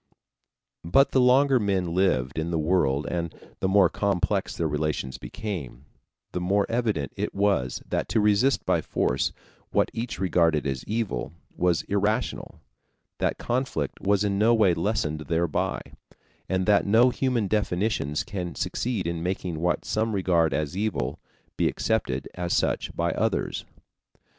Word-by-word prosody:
But 115 +12 +4
the 130 - +4
longer 130 +1 +5
men 95 -5 0
lived 80 -7 +1
in 80 +2 -2
the 85 - 0
world 75 -4 +1
and 85 -1 -3 0.2
the 95 - 0
more 95 -1 +5
complex 100 -1 -1
their 85 - 0
relations 75 -3 -2
became, 75 - -6 0.5
the 90 - -3
more 100 +3 +2
evident 110 -12 -1
it - - -3
was 100 -11 +1
that - - -2
to 110 - +2
resist 105 +6 +3
by - - +2
force - - 0 0.4
what - - +1
each 115 +1 -4
regarded 85 -5 +2
as 65 -2 -2
evil 105 - -2 0.2
was 90 -2 +1
irrational, 105 +4 -1 0.6
that - - 0
conflict 120 - -2
was 100 0 +2
in 100 -1 0
no 115 +2 +5
way 105 -6 +4
lessened 85 -4 -1
thereby, 85 -1 0 0.7
and 95 0 0
that 105 -1 +3
no 115 +5 +5
human 125 -5 0
definitions 95 -7 0
can 90 -4 -5
succeed 115 -7 -2
in 85 -1 -2
making 90 -2 -3
what 90 +2 0
some 110 +1 0
regard 85 -5 +2
as 75 +3 -2
evil 75 -11 -2 0.4
be - - +2
accepted 65 +2 -1
as 90 -1 -2
such - - 0
by - - 0
others. - - -1
95 Hz, 150 wpm, -26 LUFS, 80-105 Hz, 0.7 s, longer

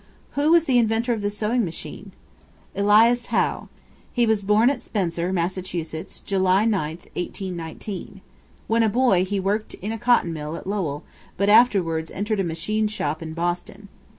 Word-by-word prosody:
Who 290 +2 +1
was 335 -1 +5
the 255 -4 +3
inventor 230 +1 +1
of 220 - -3
the 205 - 0
Sewing 215 +4 0
Machine? 170 -4 -7 0.6
Elias 220 +4 +4
Howe. - - 0 0.4
He 240 -1 +2
was 220 -2 +2
born 210 +5 +4
at 270 - -4
Spencer, 175 -3 -2
Mass., 180 0 0
July 185 +3 -1
9, 195 -9 +1 0.2
1819. 180 +2 -6 0.4
When 230 +1 +2
a 225 - +3
boy 225 -5 +3
he 195 +1 -2
worked 205 +3 -1
in 205 +4 -5
a 225 - -4
cotton 240 -8 +3
mill 150 0 -5
at - - -8
Lowell, 185 -8 -2 0.3
but 200 +1 +2
afterwards 185 -8 +4
entered 210 +1 -2
a - - +2
machine 180 +6 -1
shop 160 -7 -3
in 160 -1 -6
Boston. 175 +4 -3
200 Hz, 160 wpm, -23 LUFS, 175-225 Hz, 0.6 s, was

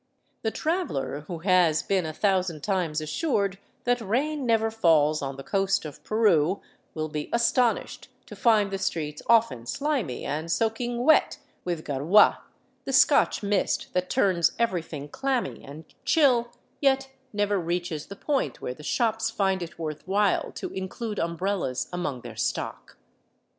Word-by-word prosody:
The 220 - 0
traveler 220 - -2
who 175 - -4
has 180 -5 +4
been 190 -4 0
a - - -3
thousand 185 -3 0
times 175 -6 0
assured 200 - -1 0.2
that 245 0 +1
rain 265 +6 -1
never 225 -1 +2
falls 155 -8 +3
on 135 -1 -4
the 135 - -8
coast 195 0 0
of 150 - -9
Peru 195 -5 +2 0.4
will 155 -1 -2
be 150 -1 -5
astonished 235 0 +1 0.2
to - - -10
find 215 -5 +3
the 195 - -2
streets 150 -5 -3
often 225 - +3
slimy 270 - -2
and 155 +4 -3
soaking 235 +3 0
wet 315 +4 +4 0.3
with 170 -3 -3
gariia, 150 +9 +4 0.4
the - - -4
Scotch - - +4
mist 200 -1 0
that 180 0 -1
turns 175 -4 +2
everything 165 -10 -2
clammy 265 - -2
and 150 +3 -10 0.2
chill, 250 -7 +3 0.3
yet 270 -1 +2 0.2
never 205 -1 +1
reaches 170 -3 -3
the 200 - -8
point 280 +6 -1
where 125 - -4
the 140 - -14
shops 225 +6 0
find 190 -2 0
it 170 -1 -7
worth 155 0 -5
while 200 0 +1
to - - -5
include 205 +3 -4
umbrellas 170 -6 -1
among 175 -8 -3
their - - -9
stock. - - -3
190 Hz, 150 wpm, -26 LUFS, 155-230 Hz, 0.4 s, has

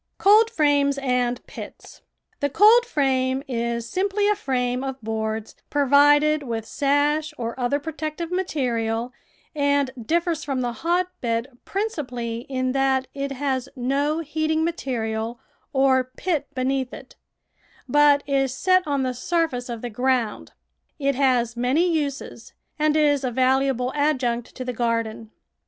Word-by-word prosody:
COLDFRAMES 305 -10 +4
AND 250 -2 -1
PITS - - -11 0.4
The 285 - 0
coldframe 275 - +3
is 235 -2 -2
simply 400 - 0
a 420 - +3
frame 250 -7 -1
of 270 -1 -4
boards 220 0 -3
pro 290 -1 +1
vided 290 +2 +5
with 230 -5 -4
sash 295 +4 +1
or 235 -1 -3
other 250 +3 +1
protective 315 +2 -5
material, 245 -10 -1 0.4
and 285 -2 +1
differs 335 +2 0
from 270 -3 -2
the 240 -1 -2
hotbed 275 -6 -1 0.2
principally 250 - -3
in 255 -1 -1
that 265 -1 +1
it 280 0 -3
has 265 -1 -2
no 280 +5 0
heating 315 +1 -1
material 230 -7 -3 0.3
or 265 -1 +3
pit 290 +3 -2
beneath 260 0 -1
it, - - -13 0.7
but 290 +1 +4
is 270 -2 +1
set 370 0 +4
on 280 -2 0
the 255 -1 -1
surface 255 -2 -1
of 235 -1 -6
the 245 - -3
ground. 245 -1 -1 0.4
It 280 -2 +1
has 250 -3 +1
many 260 +9 +2
uses 295 -5 -3 0.3
and 305 0 +2
is 290 -2 +3
a 255 - 0
valuable 260 0 +1
adjunct 255 -5 0
to 255 - -6
the 250 - -3
garden. 230 -2 -2
270 Hz, 135 wpm, -23 LUFS, 245-300 Hz, 0.7 s, vided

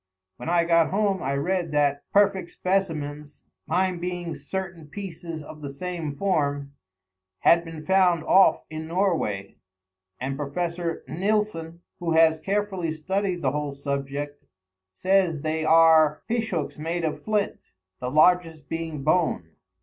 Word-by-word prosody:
When 125 - -5
I 170 0 +3
got 165 -1 +3
home 195 -1 +1
I 135 +1 -1
read 175 +3 -1
that 145 -1 +1
perfect 195 -3 +3
specimens, 150 -7 -2 0.2
mine 185 -1 +1
being 175 -1 -4
certain 185 -5 -6
pieces 170 -2 -7
of 150 +1 -11
the 140 - -5
same 160 0 -5
form, 145 -6 0 0.7
had 170 0 +5
been 165 -2 -9
found 185 -4 +3
off 190 +4 +5
in 155 0 -5
Norway; 165 - -1 0.6
and 135 +2 -3
Professor 170 +3 -3
Nilsson, 180 -3 -1 0.2
who 170 -2 -1
has 160 0 +5
carefully 195 -2 -1
studied 185 +3 -2
the - - +2
whole 145 -1 -3
subject, 140 +1 -4 0.5
says 185 - +1
they 155 +1 -1
are 160 -1 +5
fish 230 -1 -1
hooks 160 -3 -3
made 165 +2 -2
of 155 - -3
flint, 210 -1 0 0.4
the 125 - -3
largest 160 0 +3
being 160 -3 -4
bone. 155 - +1
165 Hz, 135 wpm, -25 LUFS, 150-185 Hz, 0.7 s, had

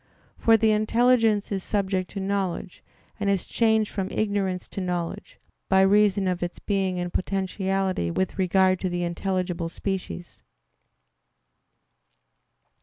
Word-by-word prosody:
For 225 -1 +4
the 220 0 +3
intelligence 225 0 +3
is 195 -2 -2
subject 190 -3 -1
to 200 - -6
knowledge, 190 -2 -3 0.4
and 200 -1 0
is 195 -2 0
changed 220 -2 +2
from 195 -2 -3
ignorance 200 -3 -1
to 195 - -5
knowledge, 175 -2 -4 0.3
by 190 0 +5
reason 200 0 +4
of 180 -1 -1
its 175 0 -3
being 195 -3 -1
in 175 0 -3
potentiality 190 - -1
with 190 - -2
regard 185 0 +3
to 185 - -1
the 175 0 -2
intelligible 175 -1 -2
species. 185 -1 -5
190 Hz, 125 wpm, -25 LUFS, 180-205 Hz, 0.4 s, by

